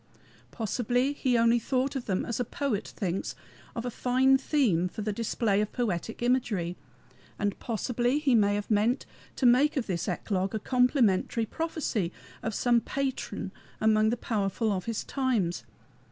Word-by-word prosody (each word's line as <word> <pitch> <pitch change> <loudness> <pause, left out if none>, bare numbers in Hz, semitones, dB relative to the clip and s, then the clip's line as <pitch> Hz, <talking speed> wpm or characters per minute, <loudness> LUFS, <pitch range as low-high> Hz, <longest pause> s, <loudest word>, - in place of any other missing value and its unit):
Possibly 245 +4 0
he 260 -4 +1
only 230 +1 +4
thought 260 +4 -1
of 265 - -4
them 190 -3 0
as 235 - -3
a - - +2
poet 240 -3 -2
thinks 190 -2 -2 0.4
of 230 - -3
a 245 - -2
fine 260 +3 +3
theme 255 - +2
for 215 - -6
the 210 0 -1
display 210 -2 +1
of 210 - -2
poetic 225 -1 -2
imagery; 220 -9 0 0.6
and 205 -1 -1
possibly 240 +3 0
he 290 -4 +2
may 205 -3 +4
have 205 +2 -4
meant 220 +5 +2 0.3
to 265 - 0
make 265 +5 +5
of 255 - 0
this 175 -4 -2
eclogue 190 0 -1
a - - 0
complimentary 245 -3 +2
prophecy 270 - -2 0.3
of 220 -2 -3
some 240 -1 +3
patron 275 +1 -3 0.3
among 215 0 +4
the 240 - 0
powerful 215 0 -1
of 185 -2 -2
his 230 -2 -2
times. 235 -11 -1
230 Hz, 160 wpm, -28 LUFS, 205-255 Hz, 0.6 s, make